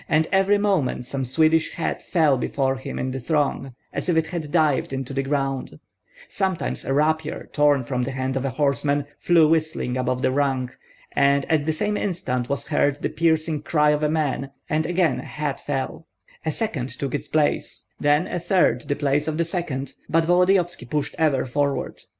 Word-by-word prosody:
And 160 -1 +3
every 195 +1 +4
moment 190 -12 0
some 135 +2 -3
Swedish 160 +5 +2
hat 170 - -2
fell 155 -6 +3
before 135 +1 -1
him 130 - -6
in 130 - -2
the 135 - -4
throng, 135 -2 -1 0.2
as - - -3
if 170 - +3
it 160 - +3
had 160 -3 -5
dived 155 -5 +2
into 135 0 -4
the 135 - 0
ground; 135 - -2 0.5
sometimes 190 -3 -2
a - - -3
rapier, 155 +2 0
torn 145 -3 +3
from 125 0 -2
the 125 - -1
hand 130 0 -2
of 135 - -1
a 135 - 0
horseman, 140 +1 +1
flew 170 -3 +5
whistling 155 -5 0
above 125 0 -1
the - - +3
rank, 130 -2 0 0.4
and 140 0 +3
at 155 -1 +2
the - - +3
same 210 +6 -1
instant 125 -10 -2
was 140 0 -2
heard 145 +1 +1
the - - +1
piercing 160 -2 +1
cry 150 -1 +3
of 150 0 0
a 150 - +2
man, 145 -3 -1 0.2
and 155 +1 0
again 170 -7 +1
a - - -6
hat 150 -2 -4
fell; 145 +3 -4 0.4
a 160 - 0
second 150 - -2
took 130 +1 -5
its 145 - -3
place, 155 -1 0
then 145 +4 +3
a 180 - -3
third 175 -8 +2
the 145 - 0
place 145 +1 0
of 155 -1 -1
the 170 - +1
second; 140 -6 -3 0.2
but 165 0 +3
Volodyovski 175 -4 +2
pushed 150 0 -1
ever 150 -5 +2
forward. 140 +2 -1
145 Hz, 190 wpm, -23 LUFS, 135-160 Hz, 0.5 s, flew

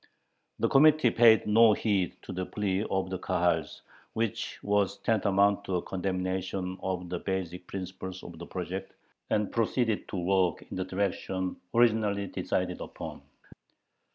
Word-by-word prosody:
The - - +2
Committee 150 -2 +5
paid 115 -2 +6
no 110 +1 +6
heed 100 -5 0
to - - -7
the 95 - -2
plea 100 -1 -1
of 95 -1 -1
the 95 - -3
Kahals, 85 -4 0 0.3
which 115 -2 -2
was 100 -1 +1
tantamount 100 -2 +2
to 95 - -1
a 90 - +1
condemnation 95 0 -3
of 90 -1 -3
the 90 -1 -3
basic 90 -2 -4
principles 95 -1 -6
of 85 -2 -10
the 85 - -8
project, 95 +1 -5 0.4
and 105 -2 +1
proceeded 115 -1 0
to 100 - -5
work 90 0 +1
in - - -4
the 95 - -1
direction 95 -1 -2 0.2
originally 110 -4 +3
decided - - -2
upon. - - -7
95 Hz, 145 wpm, -29 LUFS, 90-105 Hz, 0.4 s, paid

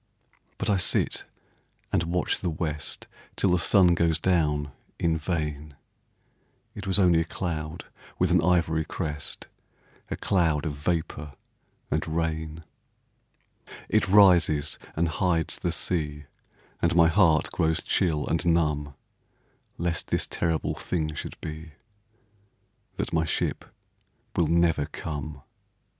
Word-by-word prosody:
But - - -3
I 100 - +3
sit 90 - +1 0.7
and - - +3
watch 85 +1 0
the 90 - -1
west 75 -2 -4 0.3
Till 95 - +2
the 90 - +3
sun 90 0 +5
goes 85 -2 +2
down, 75 -5 +1 0.3
in 80 -1 +1
vain; 75 -3 -3 1.0
It 100 -1 -8
was 95 - +4
only 90 -4 +5
a - - +2
cloud 80 -2 -4 0.3
with 90 -1 +2
an 90 -1 +5
ivory 80 -2 +2
crest, 75 -2 -5 0.6
A - - -2
cloud 80 -6 +1
of 75 - -2
vapor 75 -1 -3 0.6
and - - 0
rain; 80 0 -2 1.3
It - - +2
rises 90 -7 +5 0.2
and 85 +2 +1
hides 85 0 0
the - - -1
sea, 75 -4 -2 0.6
And - - +2
my 85 -1 +7
heart 85 -3 +3
grows 80 0 +1
chill 80 -6 +1
and 85 - 0
numb, 75 -4 +1 0.8
Lest 85 -1 -1
this - - 0
terrible 80 -2 -1
thing 80 -3 -2
should - - -7
be, 80 0 -7 1.2
That - - -3
my 80 0 +2
ship - - -1 0.7
will 85 -4 +2
never 80 -3 +2
come. 75 -2 -6
80 Hz, 125 wpm, -26 LUFS, 75-85 Hz, 1.3 s, my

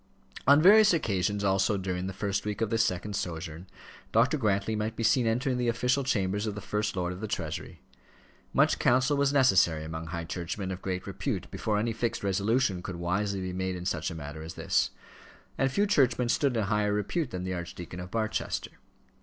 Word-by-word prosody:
On 140 +1 +8
various 205 +3 +7
occasions 100 - 0
also 95 +1 +2
during 95 -1 -3
the - - -3
first 100 0 -2
week 105 -1 -3
of 115 - 0
this 115 0 +3
second 100 -1 -2
sojourn, 85 0 -5 0.4
Dr. 120 +7 +3
Grantly 110 -4 0
might 110 +1 -2
be 115 - -3
seen 115 +2 +3
entering 125 +3 0
the 120 - 0
official 125 +4 +1
chambers 105 -4 0
of 105 - -3
the - - -4
First 105 0 -2
Lord 90 -1 -1
of 90 - -9
the 110 - -3
Treasury. 80 -6 -5 0.7
Much - - +3
counsel 130 +4 +3
was 140 0 +2
necessary 95 - +4
among 80 +1 -6
high 85 0 -4
churchmen 90 +3 -4
of 95 0 -6
great 90 -1 -3
repute - - -4
before 105 -1 -1
any 115 +2 0
fixed 115 0 -2
resolution 100 +1 +1
could 90 0 -6
wisely 95 +3 -1
be 90 0 -4
made 95 0 -2
in 90 0 -6
such 85 -3 -1
a 85 - -7
matter 75 0 -7
as 80 +1 -8
this; - - +1 0.7
and 135 -1 +1
few 200 +9 +2
churchmen 125 - +2
stood 135 -1 +2
in 110 - +1
higher 105 0 +1
repute 110 - -1
than 90 -5 -5
the 95 0 -3
Archdeacon 85 0 -6
of 90 0 -7
Barchester. 110 +1 -2
105 Hz, 200 wpm, -29 LUFS, 90-115 Hz, 0.7 s, On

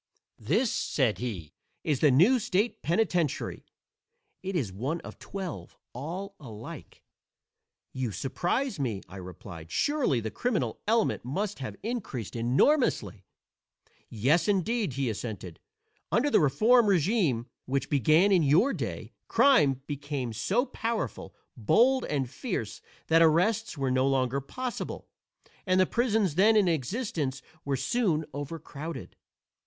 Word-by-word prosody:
"This," 210 - +1
said 130 -7 0
he, 100 -11 -5 0.3
"is 145 -4 0
the 150 - +5
new 180 - +5
state 210 +2 0
penitentiary. 170 -2 0 0.7
It 190 0 -4
is 120 - -1
one 135 - -2
of - - -11
twelve, 190 -5 -7 0.2
all 175 +10 -5
alike." 110 -7 -10 0.9
"You 130 -4 -2
surprise 175 - -2
me," 115 -8 -2
I 95 - -10
replied. 90 -2 -9
"Surely 285 - +1
the 110 -1 -4
criminal 200 - -1
element 225 0 +2
must 190 - -3
have 115 -6 -5
increased 200 - -4
enormously." 120 - +2 0.8
"Yes, 140 +10 +2
indeed," 205 - +1
he 135 0 -1
assented; 105 -6 -5 0.5
"under 285 +5 +2
the - - +5
Reform 215 - +4
régime, 175 - +2 0.2
which 135 0 -1
began 155 - +4
in 185 -3 +5
your 160 - +4
day, - - -5
crime 145 - +4
became 145 -4 -4
so 195 - +1
powerful, 230 - -4 0.2
bold 245 - +3
and 135 -3 -1
fierce 125 - -4 0.2
that 165 +1 +4
arrests 180 +5 +3
were 135 -2 0
no 130 +1 +2
longer 135 0 +1
possible 250 - -5 0.6
and 185 0 +3
the 185 - +5
prisons 220 - +1
then 210 +7 +5
in 205 -3 +4
existence 155 - -2 0.2
were 140 -1 -1
soon 175 - 0
overcrowded. 145 0 -7
155 Hz, 125 wpm, -28 LUFS, 130-210 Hz, 0.9 s, the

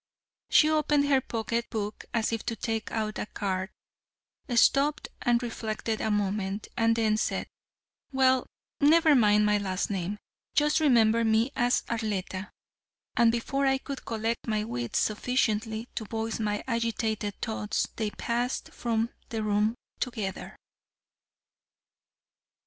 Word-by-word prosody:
She 305 - +6
opened 300 -2 +3
her 270 -2 +4
pocket 230 0 -2
book 210 -1 -4
as 230 -1 0
if 225 - -2
to 230 - -1
take 225 -1 -3
out 215 -1 -2
a - - -3
card, 190 -2 -2 0.9
stopped 280 +5 +3
and 240 -1 +2
reflected 220 -1 -3
a - - 0
moment, 205 -1 -1
and 230 0 +3
then 220 -2 +2
said, - - -1 0.7
"Well, 260 -1 +3 0.3
never 315 +1 +6
mind 210 -5 +5
my 210 0 +3
last 190 0 -2
name; 195 +1 -2 0.4
just 300 +1 +3
remember 230 -6 +4
me 225 +3 +2
as 245 -1 +2
Arletta," 205 -4 -3 0.7
and 235 -1 +5
before 275 +4 0
I 270 0 +3
could 275 0 -7
collect 225 +1 -2
my 215 -1 0
wits 120 - -3
sufficiently 220 0 0
to 220 - -4
voice 225 +1 -3
my 210 -1 -1
agitated 225 -3 -1
thoughts 220 -2 -1
they 220 -2 0
passed 240 +4 -2
from 230 -1 -1 0.2
the 220 -2 -2
room 210 +2 +1 0.2
together. 220 -7 -4
225 Hz, 130 wpm, -28 LUFS, 210-245 Hz, 0.9 s, She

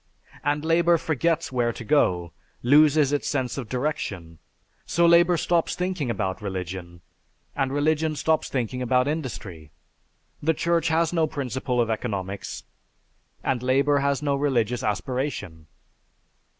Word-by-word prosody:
And 145 +1 0
labor 170 +1 +4
forgets 165 +1 0
where 120 -2 +1
to 120 - -8
go, 90 - +2 0.3
loses 145 +2 +5
its 145 - -1
sense 130 -3 -1
of 120 -5 -7
direction. 110 - -3 0.5
So 170 - +2
labor 170 +1 +5
stops 170 +1 +1
thinking 180 -7 -2
about 95 -4 -2
religion, 90 -3 -6 0.5
and 135 -2 0
religion 155 +2 +1
stops 160 +2 0
thinking 125 -1 -2
about 125 +1 +2
industry. 110 - -5 0.7
The 160 +2 +1
Church 170 +1 +1
has 165 +1 +1
no 165 -2 +2
principle 130 -3 -2
of 115 -1 +2
economics, 100 -4 -4 0.8
and 130 -3 0
labor 140 +3 +2
has 140 0 0
no 140 -1 +1
religious 125 -4 0
aspiration." 105 - -3
135 Hz, 130 wpm, -25 LUFS, 115-155 Hz, 0.8 s, loses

